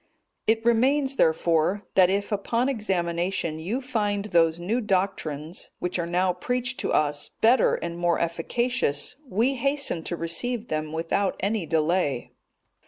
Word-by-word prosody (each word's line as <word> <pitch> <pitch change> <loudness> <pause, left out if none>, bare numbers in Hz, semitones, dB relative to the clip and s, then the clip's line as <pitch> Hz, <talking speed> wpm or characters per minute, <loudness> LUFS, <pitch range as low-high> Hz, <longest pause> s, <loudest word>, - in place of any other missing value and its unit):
It 225 +1 +2
remains, 265 +4 +3
therefore, 165 +4 +2
that 185 -2 +5
if 200 +2 -1
upon 230 +5 0
examination 175 - -1
you 210 +11 -2
find 205 -5 -1
those 165 -4 +3
new 215 +8 -1
doctrines, 180 -6 -2
which 180 0 -3
are 170 - -1
now 180 +1 +1
preached 250 +7 -2
to - - -1
us, 145 -1 +1
better 240 +4 +4
and 170 0 -5
more 175 -1 +2
efficacious, 170 - -1
we 245 +1 +1
hasten 275 - -1
to 175 - -2
receive 225 +8 -2
them 155 0 -2
without 165 +5 0
any 200 -3 -1
delay." 155 -4 0
190 Hz, 140 wpm, -25 LUFS, 165-235 Hz, -, that